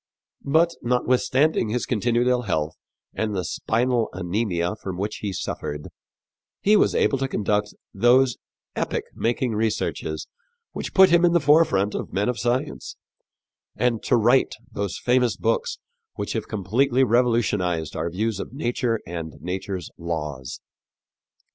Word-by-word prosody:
" - - -69
But, 160 +4 +3
notwithstanding 125 +2 +2
his 120 +3 -1
continued 120 +1 +1
ill 125 -1 +2
health 80 -8 -1 0.4
and 110 -2 -2
the 90 - -1
spinal 120 +4 0
anemia 90 0 -1
from 95 -4 -6
which 105 +3 -3
he 105 - -3
suffered, 75 -5 -5 0.7
he 210 +2 +4
was - - +3
able 135 - +2
to 135 - 0
conduct 105 -3 -1 0.2
those 120 +3 +4 0.4
epoch - - -1
making 120 +1 0
researches 105 -7 -2 0.5
which - - -6
put 190 -2 +7
him 170 0 +5
in 175 -1 +4
the 170 - +5
forefront 145 -10 +3
of - - -5
men 100 +4 +1
of 125 - -2
science, 120 - -2 0.8
and 115 -1 +1
to - - +2
write 120 +4 +3 0.2
those 100 -2 -3
famous 125 -2 +2
books 480 -1 0 0.4
which - - -3
have - - -3
completely 120 +6 +1
revolutionized 105 - +1
our 85 - -2
views 105 +4 -2
of - - -6
nature 120 -4 -1
and 80 -2 -6
nature's 90 +2 -4
laws. 75 -6 -4
115 Hz, 140 wpm, -24 LUFS, 95-125 Hz, 0.8 s, put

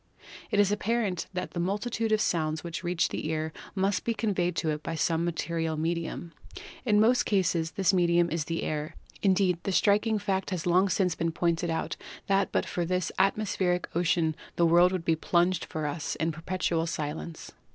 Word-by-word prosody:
It 205 - +1
is 205 -1 +4
apparent 205 -3 0
that 180 -1 -4
the 175 - -4
multitude 215 +5 -1
of 215 - +4
sounds 155 -4 0
which 170 +1 -5
reach 175 -1 +1
the - - -4
ear 160 0 -2 0.2
must 195 0 +1
be 230 - -1
conveyed 190 -5 0
to 160 0 0
it 150 0 -3
by 165 0 -4
some 165 +1 +1
material 165 -1 -2
medium. 170 +1 -3 0.5
In 210 -2 +4
most 240 +4 +4
cases 170 -5 +1
this 195 -2 +2
medium 175 -1 +3
is 160 -2 -1
the 165 +2 -2
air; 155 +1 -3 0.3
indeed, 185 -3 +3
the 195 - -2
striking 210 +3 +3
fact 195 -2 -1
has 180 -5 -3
long 180 +3 +4
since 180 -1 +1
been 165 0 -1
pointed 170 0 0
out 160 - -2 0.3
that 195 0 +2
but - - +1
for 175 - -2
this 180 +1 -1
at 195 - +3
mospheric 180 -5 -1
ocean 165 -2 +2 0.2
the 170 - +3
world 175 +2 +5
would 185 -3 -3
be 165 - +3
plunged 175 +2 +1
for 155 -1 -4
us 150 +1 -3
in 165 0 0
perpetual 165 0 -1
silence. 155 +1 -5
175 Hz, 190 wpm, -28 LUFS, 165-195 Hz, 0.5 s, world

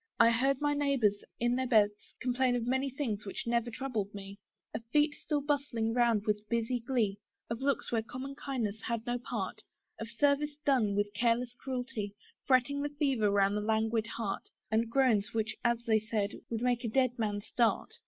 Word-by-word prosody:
I 230 0 +7
heard 265 +3 +2
my 290 0 +2
neighbours, 270 -8 +1 0.2
in 240 +1 +2
their 260 0 0
beds, 210 -3 +2
complain 255 0 +1
Of 240 -2 -1
many 265 +2 +1
things 245 -7 -3
which 195 - -5
never 235 0 +1
troubled 225 -5 -3
me; 200 0 -8 0.3
Of 225 - -4
feet 295 +5 +3
still 300 -1 -2
bustling 275 -6 0
round 235 -3 +3
with 210 -1 -1
busy 235 +1 0
glee, 230 -5 0 0.3
Of 230 +2 -3
looks 280 0 0
where 230 -2 +2
common 255 +4 -6
kindness 235 -7 -3
had 235 -1 -3
no 245 0 -1
part, 240 - -4 0.4
Of 225 - -5
service 285 +4 +1
done 235 -8 +3
with 205 0 0
careless 235 +2 +1
cruelty, 245 -6 -4 0.3
Fretting 270 +2 +3
the 290 - -1
fever 275 -7 +1
round 200 0 +3
the 210 - 0
languid 220 +1 +1
heart, 225 -3 -4 0.2
And 225 +1 +2
groans, 230 -5 +2
which, 220 0 0
as 235 -1 +1
they 220 -1 +4
said, 215 -2 -1 0.2
would 230 0 -2
make 245 -1 +1
a 230 - -1
dead 255 +1 +1
man 205 -2 -1
start. 230 +2 +1
235 Hz, 185 wpm, -32 LUFS, 215-260 Hz, 0.4 s, I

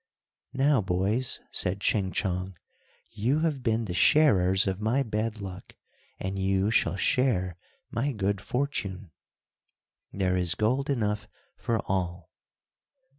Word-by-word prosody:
"Now, 135 -2 +3
boys," 95 +7 0
said 90 +2 0
Ching 95 -1 +1
Chong, 90 -1 -2 0.5
"you 125 +9 0
have 155 -5 0
been 115 -2 0
the 90 - -4
sharers 95 - +4
of 95 +1 -2
my 120 +6 +2
bad 110 -1 -3
luck, 95 -2 -8 0.4
and 95 +1 -3
you 95 +2 +1
shall 110 - +2
share 95 -4 +1 0.4
my 135 +5 0
good 100 -4 -1
fortune." 105 - -3 1.0
"There 95 -2 0
is 90 +1 +1
gold 130 +7 0
enough 105 -6 -1 0.3
for 115 - -1
all." 90 -3 -2
100 Hz, 125 wpm, -28 LUFS, 95-120 Hz, 1.0 s, sharers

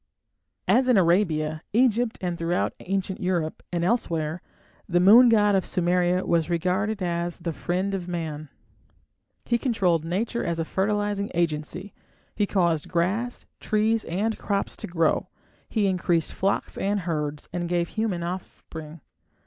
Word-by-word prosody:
As 255 0 +4
in 245 - +5
Arabia, 165 -4 +2
Egypt, 240 0 +2
and 175 -2 -1
throughout 170 +1 -1
ancient 190 0 -2
Europe 175 -4 -1
and 170 -1 -1
elsewhere, 170 -6 0 0.5
the 175 0 +3
moon 225 +7 +8
god 210 -2 +4
of 190 -1 +3
Sumeria 180 +1 +1
was 170 -1 +1
regarded 185 +4 0
as 170 0 -2
the 170 -2 -4
"friend 185 +5 -2
of 185 -2 -3
man". 155 -4 -4 1.0
He 235 0 +1
controlled 190 - +1
nature 205 +8 -2
as 170 -1 -1
a 165 - -1
fertilizing 205 +2 -1
agency; 170 +3 -2 0.4
he 205 -1 0
caused 175 -4 +1
grass, 195 +8 -1
trees, 215 +1 +1
and 210 +6 -1
crops 200 -1 -2
to - - -6
grow; 165 -2 +1 0.4
he 215 -3 +1
increased 175 -3 +1
flocks 195 +1 -1
and 200 +1 0
herds, 150 -4 -3
and 175 -1 -2
gave 175 -1 0
human 215 -6 -2
offspring. 165 -3 -7
180 Hz, 140 wpm, -25 LUFS, 170-205 Hz, 1.0 s, moon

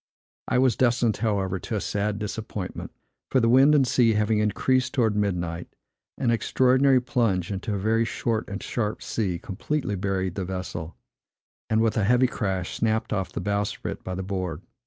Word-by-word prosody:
I - - +1
was 130 -3 +3
destined, 120 -3 +2
however, 100 -4 -1
to 110 - -4
a - - 0
sad 105 +1 -1
disappointment; 105 -2 -5 0.4
for 130 - +3
the 115 - +2
wind 135 +5 +6
and 140 -3 +4
sea 120 -2 +3
having 105 0 +2
increased 130 +5 +1
towards 115 -5 +2
midnight, 85 -5 -1 0.5
an 125 -4 +1
extraordinary 130 +3 +3
plunge 115 - 0
into 100 +2 -3
a - - -1
very 110 +4 +2
short 115 -2 -2
and 100 - -5
sharp 110 -3 -2
sea 95 -6 -1
completely 105 - -3
buried 95 -2 -1
the 95 - -3
vessel, 90 -3 -5 0.7
and, 110 0 +3
with 115 -1 +1
a 110 - +2
heavy 125 +5 +4
crash, 95 -7 -2
snapped 110 -1 0
off 95 -3 -2
the - - -4
bowsprit 105 0 -2
by 90 - -4
the 95 - -4
board. 95 -3 -4
105 Hz, 175 wpm, -25 LUFS, 95-120 Hz, 0.7 s, wind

